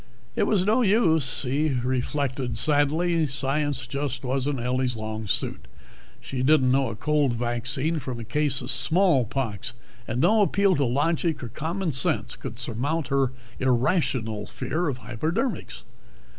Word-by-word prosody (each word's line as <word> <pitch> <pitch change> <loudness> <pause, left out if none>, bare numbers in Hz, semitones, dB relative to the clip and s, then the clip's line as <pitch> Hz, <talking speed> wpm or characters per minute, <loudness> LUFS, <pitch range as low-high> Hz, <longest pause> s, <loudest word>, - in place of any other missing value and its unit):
It - - +1
was 190 -4 +2
no 220 +5 +3
use, 165 - +2
he 145 +4 0
reflected 130 -1 -1
sadly. 155 +5 +2
Science 140 +1 0
just 140 -2 -3
wasn't 135 +1 -1
Ellie's 125 +1 0
long 110 -1 -5
suit; 95 - -1 0.5
she 130 -2 -4
didn't 130 -1 +4
know 135 -1 +2
a 110 - -5
cold 150 0 +1
vaccine 120 +7 -1
from 130 -3 -5
a - - -5
case 145 +3 +1
of 125 - -1
smallpox, 125 - +1 0.3
and 115 +2 -2
no 210 +9 +4
appeal 200 -1 +3
to 140 - +2
logic 150 +4 0
or 120 - -5
common 165 +5 -2
sense 130 -2 0
could - - -7
surmount 145 +5 -2
her 135 -2 +2 0.3
irrational 125 - 0
fear 170 +2 -2
of 130 - -3
hypodermics. 155 - -3
135 Hz, 145 wpm, -25 LUFS, 125-160 Hz, 0.5 s, didn't